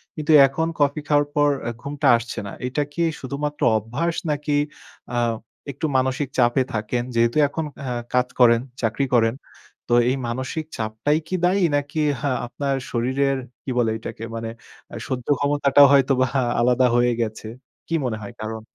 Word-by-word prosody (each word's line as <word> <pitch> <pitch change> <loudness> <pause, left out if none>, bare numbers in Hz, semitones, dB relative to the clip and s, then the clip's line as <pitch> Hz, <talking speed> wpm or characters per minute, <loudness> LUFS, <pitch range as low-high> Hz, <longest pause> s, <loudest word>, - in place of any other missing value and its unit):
কিন্তু 155 0 -1 0.2
এখন 160 +5 -2
কফি 145 +1 +2
খাওয়ার 145 -1 +3
পর 145 0 +4 0.2
আ - - 0
ঘুমটা 145 0 -2
আসছে 120 +1 -6
না। - - -7
এইটা 130 +4 -1
কি 170 - -2 0.2
শুধুমাত্র 145 +2 -4 0.2
অভ্যাস 130 +11 -2
নাকি 150 0 -2 0.6
আ - - 0 0.5
একটু 140 +4 -4
মানসিক 130 +2 0
চাপে 120 +1 +3
থাকেন। 110 +3 -1
যেহেতু 115 +4 +2
এখন 155 +2 -4 0.2
অ্যা 125 -2 -3 0.2
কাজ 125 0 +3
করেন, 115 -1 +6 0.2
চাকরি 115 +5 0
করেন। 115 -1 +3 0.5
তো 120 - 0 0.2
এই 130 - +1
মানসিক 130 +6 -3
চাপটাই 110 +7 0
কি 185 - -2
দায়ী? 190 +2 +2
নাকি 145 +2 -2 0.2
হা 140 - 0 0.2
আপনার 140 +2 -2 0.2
শরীরের 130 +3 0 0.3
কি - - -6
বলে 115 -2 +2
এটাকে 110 0 -8
মানে 115 0 -4 0.4
আ - - -6
সহ্য 125 -2 -4
ক্ষমতাটাও 145 0 +5
হয়তোবা 130 -1 +3 0.3
আলাদা 125 +1 +3
হয়ে 120 0 +3
গেছে, 110 -1 -4 0.4
কী 165 - -5
মনে 110 -3 -3
হয় 110 - -8
কারণ? 110 0 -5
130 Hz, 165 wpm, -22 LUFS, 120-145 Hz, 0.6 s, করেন